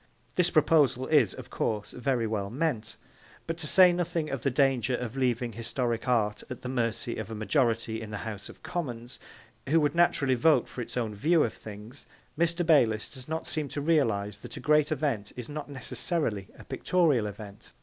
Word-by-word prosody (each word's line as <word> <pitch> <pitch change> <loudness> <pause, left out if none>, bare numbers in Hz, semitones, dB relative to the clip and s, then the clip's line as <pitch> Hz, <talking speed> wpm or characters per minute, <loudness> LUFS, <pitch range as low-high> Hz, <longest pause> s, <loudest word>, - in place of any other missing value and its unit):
This 180 -1 +2
proposal 150 -6 +3
is, 140 -11 +3
of - - -10
course, 105 -2 -2
very 125 -2 0
well 105 -3 -2
meant, 120 -4 -2 0.5
but, 165 - -2
to 150 - -2
say 180 +2 +7
nothing 170 -3 -1
of 135 - -3
the 140 - +1
danger 130 -2 +2
of 120 0 -5
leaving 125 -3 0
historic 115 +2 -2
art 110 -4 +1
at 125 -1 -7
the 125 - -4
mercy 115 -2 -1
of 110 - -5
a 110 - -5
majority 115 -1 0
in 110 - -7
the 105 - -4
House 105 -3 -6
of - - -14
Commons, 120 -8 -5 0.5
who 165 +3 +5
would 150 -2 +1
naturally 170 -6 +3
vote 150 +6 +3
for 125 - -6
its 120 +1 -6
own 115 -3 -1
view 155 +10 +3
of 115 - -1
things, 110 +5 -11 0.3
Mr. 170 +2 +1
Bayliss 120 -9 +3
does 130 -2 -9
not 160 +1 -3
seem 155 -2 -2
to 145 - -5
realise 110 -10 +1
that - - -8
a - - -5
great 150 +3 +3
event 135 -9 -1
is 120 -2 -5
not 150 0 -6
necessarily 130 - -1
a - - -12
pictorial 150 -12 +1
event. 105 0 -10
125 Hz, 190 wpm, -28 LUFS, 110-150 Hz, 0.5 s, say